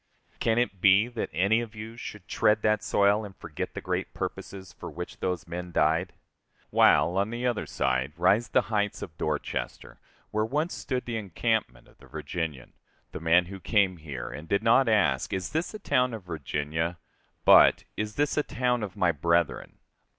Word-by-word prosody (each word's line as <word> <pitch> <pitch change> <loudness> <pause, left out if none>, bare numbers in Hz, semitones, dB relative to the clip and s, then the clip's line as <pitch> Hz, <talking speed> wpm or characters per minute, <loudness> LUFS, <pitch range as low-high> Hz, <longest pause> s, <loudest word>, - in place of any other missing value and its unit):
Can 115 0 +1
it 110 -7 0
be 100 +3 +6
that 120 -2 -4
any 100 +8 +2
of 115 -2 -8
you 110 +1 -8
should 105 -5 -9
tread 105 0 +2
that 110 0 +2
soil 100 +2 +2
and 100 -2 -9
forget 80 -3 -6
the - - -4
great - - -3
purposes 95 -2 -6
for - - -8
which - - -8
those 90 -3 -2
men 90 +1 -6
died? 80 +3 +2 0.6
While, 90 +3 +4
on 100 +2 0
the 120 +2 -4
other 120 -3 -1
side, 65 +3 -1
rise 100 +7 +3
the - - +4
heights 105 -1 0
of 80 - -9
Dorchester, 75 -1 -4 0.3
where 110 0 +1
once 150 +9 -1
stood 130 -2 -3
the 120 -2 -3
encampment 80 - -2
of - - -24
the 65 - -16
Virginian, 75 -2 -5 0.4
the - - -6
man 85 +2 +4
who 95 +2 -9
came 95 -2 +2
here, 75 -6 -6
and 75 +3 -8
did 100 +5 +1
not 115 +2 +4
ask, 80 - +2
Is 95 -1 -3
this 160 +3 -1
a - - -3
town 125 - +1
of 110 - -9
Virginia? 80 +1 -3 0.5
but, - - +7
Is 105 0 -4
this 145 +1 0
a - - +4
town 125 -3 -1
of 100 -4 -6
my 90 -1 +3
brethren? 85 +2 0
95 Hz, 185 wpm, -27 LUFS, 80-110 Hz, 0.6 s, but